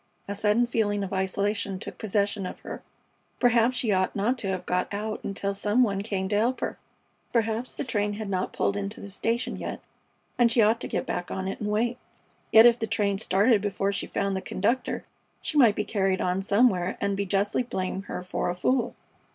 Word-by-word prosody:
A 200 - -2
sudden 210 +3 +2
feeling 205 -4 0
of 195 - -5
isolation 200 +1 -1
took 185 - -8
possession 205 -2 0
of - - -9
her. - - -7 0.6
Perhaps 240 0 +3
she 235 -3 +1
ought 185 -1 +1
not 215 +5 +1
to 200 - -3
have 190 -1 -2
got 180 0 0
out 215 +1 -4
until 200 0 -2
some 210 +5 +2
one 200 -4 0
came 195 -3 -2
to 205 - +1
help 240 +4 +1
her. - - -3 0.5
Perhaps 230 +1 0
the - - -3
train 210 -5 -1
had 215 0 -5
not 190 -1 -1
pulled 200 - 0
into 200 +1 -3
the 200 - -8
station 235 +5 -1
yet - - -5 0.6
and 235 -1 +5
she 235 - +2
ought 225 +2 +4
to - - -3
get - - -2
back 180 0 -3
on 190 0 -3
it 195 - -4
and 210 - -2
wait. 235 +4 0 0.5
Yet 220 +1 +9
if 240 0 +6
the 225 - -1
train 200 -2 0
started 205 +2 +3
before 200 -1 0
she 200 - -3
found 200 -1 -1
the 190 - -2
conductor 230 +9 -1 0.3
she - - -4
might 230 -6 +6
be 210 - 0
carried 195 -2 +1
on 180 +1 0
somewhere 200 -3 +2
and 200 0 0
be 200 0 -2
justly 200 +5 +1
blame 190 -5 -3
her - - -4
for 180 0 -2
a 175 - -2
fool. 250 +7 0
205 Hz, 210 wpm, -27 LUFS, 195-230 Hz, 0.6 s, Yet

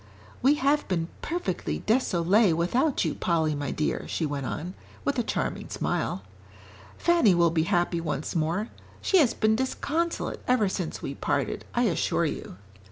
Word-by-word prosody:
"We 275 +3 +5
have 290 +1 +1
been 170 -3 -1
perfectly 330 - -2
désolée 200 -4 +3
without 245 - +1
you, - - 0
Polly, 160 -3 +1
my 145 -2 -3
dear," 150 - -2
she 165 - -1
went 140 -3 -3
on, 175 +4 -4 0.3
with 280 -3 +1
a - - +2
charming - - -2
smile. - - -2 0.7
"Fanny 335 - +4
will 170 -1 +4
be 160 -1 +1
happy 175 -1 +1
once 155 -1 -3
more. 170 +7 0 0.3
She 385 - +3
has 275 -7 +3
been 220 0 +3
disconsolate 305 +7 -2
ever 250 -5 +3
since 180 -3 -4
we 140 - -3
parted, - - -2
I - - +3
assure - - +1
you." - - -5
185 Hz, 160 wpm, -27 LUFS, 165-260 Hz, 0.7 s, We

